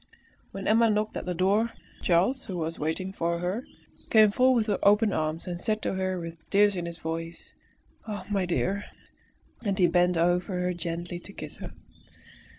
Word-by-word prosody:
When 195 0 -6
Emma 225 +1 +5
knocked 210 0 0
at - - -5
the 180 - -1
door. 200 +6 +2 0.3
Charles, 190 +10 +2
who 185 - -5
was 165 0 -3
waiting 175 +5 -2
for 170 -2 -1
her, 185 +9 -3 0.4
came 215 -2 +6
forward 255 -1 +4
with 205 - 0
open 210 +1 +4
arms 155 +1 -1
and 175 -1 -4
said 215 +2 0
to - - 0
her 185 -1 -1
with 165 -1 -7
tears 205 0 +4
in 175 -1 -3
his 170 -1 -7
voice 165 0 -5 0.5
"Ah! 210 -1 -5
my 195 -3 0
dear!" 195 +3 0 0.8
And 200 -4 0
he 180 - +5
bent 175 0 +3
over 175 +2 +1
her 180 0 0
gently 175 0 -4
to 200 - -12
kiss - - -7
her. - - -8
185 Hz, 180 wpm, -28 LUFS, 170-205 Hz, 0.8 s, came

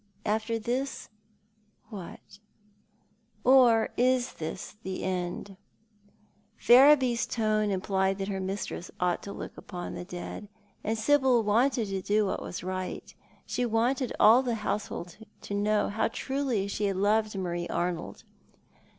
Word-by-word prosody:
After 220 +2 0
this, 245 +5 -3 0.8
what? 200 0 -10 1.0
Or 245 -4 +5
is 255 0 +2
this 165 +5 -6
the 190 -3 -5
end? 185 +1 -3 1.0
Ferriby's 255 -1 +6
tone 215 -2 +1
implied 190 0 0
that 195 -1 -3
her 195 -1 -3
mistress 190 -1 -4
ought 180 -1 +1
to 200 - -7
look - - -7
upon 175 -2 -7
the - - -6
dead, 180 +3 -7 0.4
and 220 +1 -1
Sibyl 260 0 +3
wanted 230 +3 +2
to 195 -1 -2
do 210 +2 +2
what 190 - -2
was 180 - -6
right. 185 0 -5 0.3
She 250 - -2
wanted 245 +3 +1
all 225 +4 +7
the 245 -3 -1
household 190 -4 -3 0.2
to - - -7
know 210 +1 +1
how 215 - 0
truly 260 -5 -2
she 205 +1 -2
had 195 -2 -1
loved 210 +1 +1
Marie 175 -2 -3
Arnold. 175 -1 -3
210 Hz, 135 wpm, -28 LUFS, 190-240 Hz, 1.0 s, all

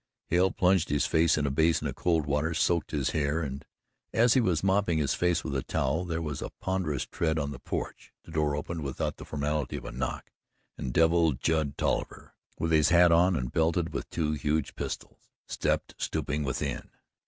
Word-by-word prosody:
Hale 90 +2 +4
plunged 90 -2 +2
his 75 0 +1
face 80 0 +3
in 75 - 0
a 70 - 0
basin 80 +4 +2
of - - -2
cold 80 -4 +1
water, 75 +3 0
soaked 85 +2 +1
his 70 -4 -1
hair 75 +2 0
and, 70 -1 -5 0.5
as 115 +1 +5
he 130 - +4
was 90 -8 +1
mopping 95 -3 +2
his 75 -3 +1
face 90 -2 +1
with 70 - -4
a 65 - 0
towel, 80 +9 -1
there 85 -1 -2
was 75 -3 -4
a - - -4
ponderous 90 -9 -1
tread 80 -2 -1
on 70 -2 -1
the 70 - -8
porch, - - -5
the - - -13
door 75 -2 +1
opened 80 +3 -4
without 70 -2 -3
the - - -9
formality 75 -2 -2
of - - -6
a - - -5
knock, 60 +1 -4 0.4
and 65 - -4
Devil 80 +1 +4
Judd 75 +2 -1
Tolliver, - - -2 0.2
with 80 - -1
his 80 -1 +4
hat 85 0 +6
on 90 +2 +4
and 60 -5 -2
belted 80 +1 +1
with - - -4
two 75 -2 -1
huge 75 0 -1
pistols, - - -6 0.2
stepped - - -1
stooping 75 +1 -2
within. 65 -2 -3
80 Hz, 200 wpm, -28 LUFS, 70-85 Hz, 0.5 s, hat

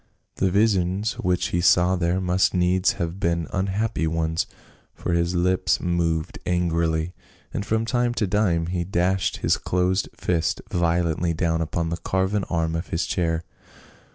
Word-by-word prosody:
The 95 - +2
visions 100 +1 +1
which 90 0 0
he 85 - 0
saw 90 +2 +4
there 90 +1 0
must 90 +1 +2
needs 90 +1 +3
have 85 -1 -4
been 85 -2 0
unhappy 95 -1 0
ones, 80 0 -1 0.5
for - - -3
his 85 +1 +1
lips 90 +1 +2
moved 85 -2 -1
angrily, 85 -1 0 0.4
and 100 - -2
from 110 +2 0
time 120 0 0
to 110 - +1
time 90 -4 +1
he 90 0 -2
dashed 95 +1 0
his - - +1
closed 90 +1 0
fist 85 -2 0
violently 85 -1 +1
down 80 -1 0
upon 80 +1 -1
the 85 - -2
carven 95 +3 0
arm 80 -2 -1
of 80 - -3
his 80 - -1
chair. 80 -2 -1
90 Hz, 155 wpm, -24 LUFS, 85-95 Hz, 0.5 s, saw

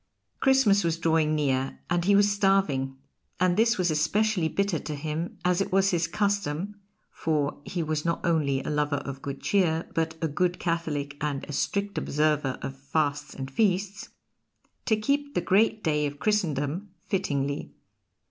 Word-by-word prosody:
Christmas 265 -7 +4
was 165 -1 0
drawing 160 -2 +2
near, 135 -3 0
and 175 -1 0
he 200 +1 +5
was 205 0 +5
starving; 190 -10 +1 0.4
and 180 0 +3
this 230 +3 +3
was 180 -3 +1
especially 180 +4 +1
bitter 195 -1 0
to 150 - -5
him, 155 +3 -4
as 180 +1 +3
it - - -2
was 195 +1 +3
his 170 -1 +1
custom 200 -1 -1 0.4
(for 150 -3 -1
he 175 -2 -2
was 155 -1 -1
not 170 0 0
only 145 -5 +1
a - - -4
lover 150 -1 +1
of 140 -1 -5
good 140 -1 -5
cheer, 170 -5 +1
but 160 0 -1
a 165 - 0
good 175 +4 0
Catholic 150 -4 -2
and 145 -2 -2
a 150 - -7
strict 200 +7 -1
observer 150 -3 0
of 135 0 -5
fasts 145 +1 -1
and 135 0 -6
feasts) 195 +3 0 0.8
to 220 - +4
keep 285 +6 -1
the - - +3
great 215 +2 +2
day 150 -2 +1
of 145 0 -7
Christendom 170 -2 0 0.2
fittingly. 140 -6 -2
165 Hz, 165 wpm, -27 LUFS, 145-195 Hz, 0.8 s, he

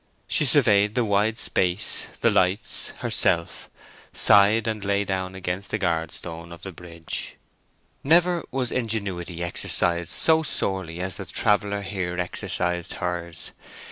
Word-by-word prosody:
She - - +2
surveyed 105 0 +4
the 125 -2 +2
wide 105 +2 +1
space, 90 -4 0
the - - +4
lights, 95 +5 0
herself, - - +1 0.4
sighed, 105 +2 +5
and 110 -2 -2
lay 100 0 +1
down 95 -1 -3
against 95 +1 -4
a - - +2
guard 85 -4 -1
stone 85 0 -8
of 85 - -11
the 95 - -6
bridge. 85 -1 -5 0.7
Never 170 +3 +4
was 130 -2 -2
ingenuity 95 -7 -3
exercised 85 0 0
so 160 0 +4
sorely 95 - -2
as 90 -2 -3
the - - -6
traveller 105 -1 +1
here 90 -3 -3
exercised 90 0 -2
hers. 85 -2 -4
95 Hz, 135 wpm, -24 LUFS, 85-105 Hz, 0.7 s, sighed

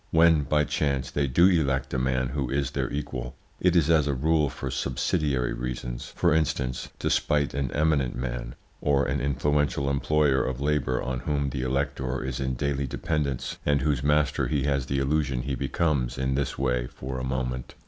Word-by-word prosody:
When, 80 -2 +5
by 75 +1 +2
chance, 70 -3 -1
they 70 -1 0
do 75 +8 +4
elect 70 -7 +1
a 65 - +1
man 65 0 0
who 70 -2 -2
is 70 +1 0
their 65 -3 -1
equal, 65 -4 -4 0.2
it 90 -1 +3
is 80 -4 +4
as 75 -3 +4
a 70 - 0
rule 75 +2 +2
for 65 0 -5
subsidiary 65 -1 0
reasons - - -5
for 85 - +3
instance, 65 -5 -1
to - - -2
spite 75 -2 +1
an 70 -2 -1
eminent 75 -4 +1
man, - - -4 0.3
or 70 -1 +2
an 70 +2 -1
influential 70 0 +1
employer 70 -1 +2
of 65 -1 -3
labour 70 -3 0
on 65 -1 -2
whom 70 +1 -1
the 65 - -3
elector 65 0 -1
is 65 -1 -3
in 65 -1 -1
daily 70 +1 -1
dependence, 70 -2 -2
and 70 -1 +2
whose 70 -3 +1
master 75 0 +2
he 75 -3 0
has 70 -2 0
the 70 - -1
illusion 70 -2 0
he 70 - -2
becomes 65 -2 0
in 65 0 0
this 70 +1 -1
way 60 -2 0
for 65 +1 -6
a - - -4
moment. 65 -1 -3
70 Hz, 190 wpm, -26 LUFS, 65-75 Hz, 0.3 s, When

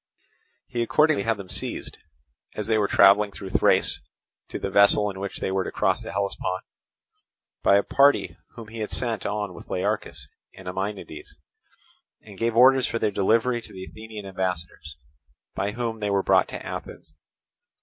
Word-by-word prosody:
He 120 - -3
accordingly 150 +2 +3
had 115 +1 0
them 100 -2 -9
seized, - - -5 0.6
as 105 - -3
they 110 -1 +2
were 100 - +2
travelling 100 +2 +5
through 95 -1 -8
Thrace - - +3 0.5
to - - -4
the 100 - -4
vessel 100 +1 +5
in 95 - -9
which 100 0 -5
they - - -2
were 95 0 0
to - - -5
cross - - +1
the - - -7
Hellespont, 95 -1 -2 1.0
by 100 - +5
a 100 - +2
party 140 +1 +3 0.2
whom 115 -3 -10
he 115 +1 -8
had 105 - -3
sent 115 -5 -2
on 105 -2 -3
with 85 - -12
Learchus 90 - -2 0.3
and 95 - -12
Ameiniades, 95 +2 -5 0.9
and 100 -3 -13
gave 115 0 0
orders 130 +2 +6
for 115 - -2
their 110 -2 0
delivery 115 +5 +2
to - - -12
the 95 - -8
Athenian 110 -1 -9
ambassadors, 90 -4 -4 0.6
by 100 +1 -2
whom 115 -1 -3
they 105 -1 -1
were 100 -1 +1
brought - - +4
to - - -8
Athens. 75 - -8
105 Hz, 170 wpm, -25 LUFS, 95-115 Hz, 1.0 s, orders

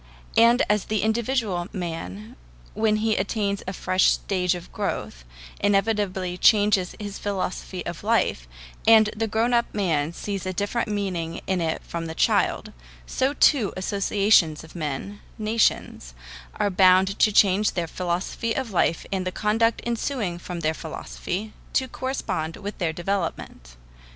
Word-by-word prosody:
And 235 +3 +5
as 210 -2 +1
the 215 -2 -1
individual 220 -5 0
man, 140 - -6 0.4
when 215 -1 +2
he 220 -1 +2
attains 200 0 -1
a 190 - -3
fresh 185 0 +1
stage 180 -2 0
of 175 0 -9
growth, - - -4 0.4
inevitably 195 -3 0
changes 205 -4 +4
his 205 -1 -6
philosophy 185 -2 -4
of 175 +1 -6
life, 210 - +1 0.4
and 220 -1 +7
the 225 +1 -1
grown 225 +3 +1
up 235 0 +2
man 165 -7 0
sees 195 +2 -5
a 185 - -2
different 205 +6 -1
meaning 185 -6 -3
in 185 -2 0
it 160 -1 -2
from 165 -1 -5
the 160 - -6
child, - - +1 0.3
so 265 - 0
too 260 -10 +4
associations 195 -4 +2
of 160 - -14
men 165 +6 -4 0.2
nations 215 - 0 0.4
are 205 - 0
bound 185 +1 +4
to 215 - +5
change 200 0 +4
their 175 -2 0
philosophy 180 +7 -2
of 260 -4 -3
life 170 -2 +1
and 190 -2 -1
the - - -1
conduct 225 +3 +1
ensuing 230 -6 -2
from 175 -1 -6
their 155 0 +1
philosophy, 180 +6 -5 0.2
to 260 - +1
correspond 250 -12 -3
with 205 +1 -6
their 170 -4 0
development. 165 - -4
195 Hz, 145 wpm, -24 LUFS, 175-215 Hz, 0.4 s, and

